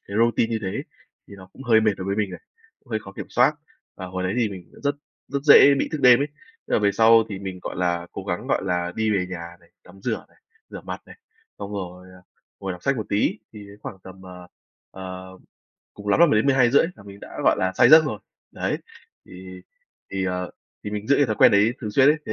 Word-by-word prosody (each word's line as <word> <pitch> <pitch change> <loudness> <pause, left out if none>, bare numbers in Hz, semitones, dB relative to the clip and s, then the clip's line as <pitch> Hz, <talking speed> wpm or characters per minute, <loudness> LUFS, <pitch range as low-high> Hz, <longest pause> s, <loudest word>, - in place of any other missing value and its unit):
cái 100 - -5
routine 115 0 +2
như 115 - -1
thế 95 - -2
ấy, - - -4 0.4
thì - - -11
nó 95 -1 -14
cũng 135 - -12
hơi 115 -3 +4
mệt 110 -1 +2
đối 95 - -6
với 100 - -1
mình 105 -3 -1
này, 90 - -9 0.4
cũng - - -28
hơi 110 - 0
khó 95 -2 -12
kiểm - - -8
soát. - - +3 0.4
Và 95 - -7
hồi 95 0 -5
đấy 90 +2 -1
thì 120 -3 +1
mình 95 -3 -8
cũng - - -16
rất 145 0 0 0.3
rất 140 0 -3
dễ 140 -1 +8
bị - - -1
thức 155 - -3
đêm 125 -1 +7
ấy, 140 - +1
thế 455 0 -15
là - - +4
về 100 -1 +2
sau 115 +1 +6
thì 100 -3 -6
mình, 95 -1 -6
gọi - - -6
là, 85 -1 -1
cố - - -7
gắng, - - -4
gọi - - 0
là, 90 -1 -1
đi 110 0 0
về 95 -3 0
nhà 85 -1 -8
này, 85 - -25
tắm 95 +2 -17
rửa - - -3
này, - - -28 0.3
rửa - - -8
mặt - - -7
này, - - -14 0.4
xong 100 - -7
rồi, 90 -2 -7
à, 90 -1 -17 0.4
ngồi 95 -1 -4
đọc 90 - -11
sách 140 -1 +1
một 110 - -4
tí, 100 - 0
thì 105 -2 -11 0.2
khoảng 95 - -8
tầm, 95 0 -13
ờ, 90 -1 -11 0.4
ờ, 95 0 -8 0.7
cùng 105 0 -8
lắm 100 - +3
là 170 - +8
10:00-12:30 130 +2 +3
là - - -14
mình 100 0 -13
đã, - - -11
gọi - - +4
là, 95 0 0
say 120 - +5
giấc 160 +2 +8
rồi. 110 -8 -3 0.3
Đấy. - - -2 0.5
Thì 95 0 -11 0.5
thì, 95 -1 -2
ờ, 90 -1 -3 0.3
thì 105 - -4
mình 105 0 -5
giữ 140 - +4
cái 145 - +3
thói 110 -2 -2
quen - - +6
đấy 105 +3 +4
thường 105 - -4
xuyên 130 +6 +4
ấy, 150 - +4
thế - - -3
100 Hz, 255 wpm, -23 LUFS, 95-115 Hz, 0.7 s, dễ